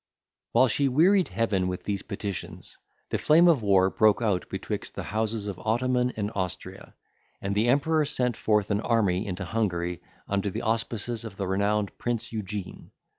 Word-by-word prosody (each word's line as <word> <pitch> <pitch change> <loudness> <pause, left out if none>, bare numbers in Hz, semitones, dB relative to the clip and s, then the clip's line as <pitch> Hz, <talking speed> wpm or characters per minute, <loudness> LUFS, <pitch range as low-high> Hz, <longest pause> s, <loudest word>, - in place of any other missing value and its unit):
While 130 - +6
she 140 +4 +2
wearied 180 +8 +4
Heaven 100 -5 0
with 90 -1 -4
these 100 -2 -2
petitions, 90 -4 -6 0.4
the - - 0
flame 165 +3 +5
of 160 -8 +4
war 95 -2 +4
broke 110 -2 +4
out 105 -6 0
betwixt - - -5
the - - -4
houses 110 +1 -2
of 100 -3 -5
Ottoman 125 +2 +1
and 105 0 -2
Austria, 95 -1 -5 0.4
and 100 +1 -2
the 105 +4 +2
Emperor 150 +5 +3
sent 125 -4 0
forth 105 -2 +1
an 100 +1 +1
army 105 -5 +1
into 95 0 -4
Hungary, 90 -4 -1 0.3
under 100 0 0
the - - -5
auspices 115 +1 -1
of 110 -4 -8
the 95 - -2
renowned 100 +2 0
Prince 120 -2 -2
Eugene. 105 -3 -6
105 Hz, 170 wpm, -27 LUFS, 95-120 Hz, 0.4 s, While